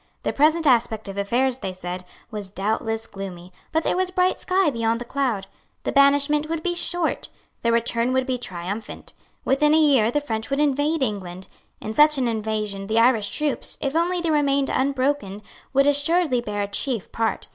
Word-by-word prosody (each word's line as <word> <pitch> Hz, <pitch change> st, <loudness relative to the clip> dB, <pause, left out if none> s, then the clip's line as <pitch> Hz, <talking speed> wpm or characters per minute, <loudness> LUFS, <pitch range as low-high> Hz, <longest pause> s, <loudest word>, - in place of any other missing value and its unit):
The -, -, -1 dB
present 315 Hz, +3 st, +3 dB
aspect 230 Hz, -5 st, +2 dB
of 195 Hz, -, -6 dB
affairs, 245 Hz, +6 st, 0 dB
they 190 Hz, -, -4 dB
said, 180 Hz, 0 st, -6 dB, 0.3 s
was 205 Hz, -3 st, -6 dB
doubtless 220 Hz, +3 st, -2 dB
gloomy; 185 Hz, -3 st, -9 dB, 0.2 s
but 320 Hz, +1 st, +1 dB
there -, -, +1 dB
was 370 Hz, 0 st, +1 dB
bright 365 Hz, 0 st, +1 dB
sky 370 Hz, -4 st, +2 dB
beyond 230 Hz, -1 st, 0 dB
the 240 Hz, -, -6 dB
cloud. 240 Hz, -7 st, -1 dB, 0.4 s
The -, -, -1 dB
banishment 285 Hz, +2 st, +3 dB
would 325 Hz, -1 st, -3 dB
be 355 Hz, -, 0 dB
short. 345 Hz, -1 st, -2 dB, 0.3 s
The 230 Hz, -, +1 dB
return 235 Hz, +1 st, +1 dB
would 260 Hz, 0 st, +1 dB
be 255 Hz, -2 st, -2 dB
triumphant. 195 Hz, +1 st, -6 dB, 0.3 s
Within 300 Hz, +3 st, +3 dB
a -, -, +5 dB
year 275 Hz, -8 st, +4 dB
the 295 Hz, -, +1 dB
French 225 Hz, -4 st, -4 dB
would 275 Hz, +1 st, 0 dB
invade 295 Hz, +1 st, +1 dB
England. 190 Hz, -5 st, -4 dB, 0.3 s
In 215 Hz, -, -5 dB
such 300 Hz, +4 st, +5 dB
an 255 Hz, -2 st, +1 dB
invasion 215 Hz, -3 st, -2 dB
the 220 Hz, +2 st, 0 dB
Irish 230 Hz, -3 st, +4 dB
troops, 300 Hz, -2 st, -1 dB
if 275 Hz, +1 st, -2 dB
only 350 Hz, +2 st, +1 dB
they 335 Hz, -2 st, 0 dB
remained 280 Hz, -2 st, +2 dB
unbroken, 260 Hz, -6 st, -1 dB, 0.3 s
would 275 Hz, 0 st, +3 dB
assuredly 290 Hz, -1 st, +2 dB
bear 205 Hz, -3 st, -3 dB
a -, -, -3 dB
chief 220 Hz, +1 st, -3 dB
part. 225 Hz, -1 st, -1 dB
255 Hz, 185 wpm, -23 LUFS, 215-295 Hz, 0.4 s, a